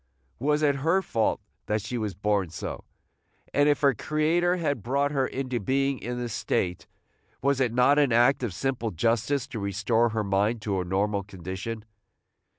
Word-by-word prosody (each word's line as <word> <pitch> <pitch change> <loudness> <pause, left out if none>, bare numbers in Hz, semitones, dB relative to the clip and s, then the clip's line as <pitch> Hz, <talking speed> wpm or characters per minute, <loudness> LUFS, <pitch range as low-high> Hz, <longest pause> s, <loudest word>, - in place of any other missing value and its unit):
Was 150 +4 +1
it 140 -2 +3
her 165 +7 +2
fault 115 -9 0 0.3
that 105 +1 +1
she 115 +3 -4
was 105 -5 -2
born 100 -2 0
so? 80 - -6 0.7
and, 145 +1 +4
if 145 -3 +2
her 140 -1 +5
Creator 165 +7 +1
had 145 - -1
brought 140 +6 0
her 135 -3 +1
into 130 -2 -3
being 135 +4 0
in 120 0 -4
this 120 -2 -4
state, 90 -4 -1 0.6
was 140 -1 +2
it 125 -4 +2
not 125 +5 +4
an 140 -4 +3
act 120 +4 +4
of 120 -5 -2
simple 120 +3 -2
justice 115 - 0
to 115 - -5
restore 100 +4 +1
her 110 -1 -1
mind 100 +4 +1
to 100 -3 0
a - - -4
normal 100 +3 0
condition? 95 +3 -6
120 Hz, 175 wpm, -27 LUFS, 105-140 Hz, 0.7 s, her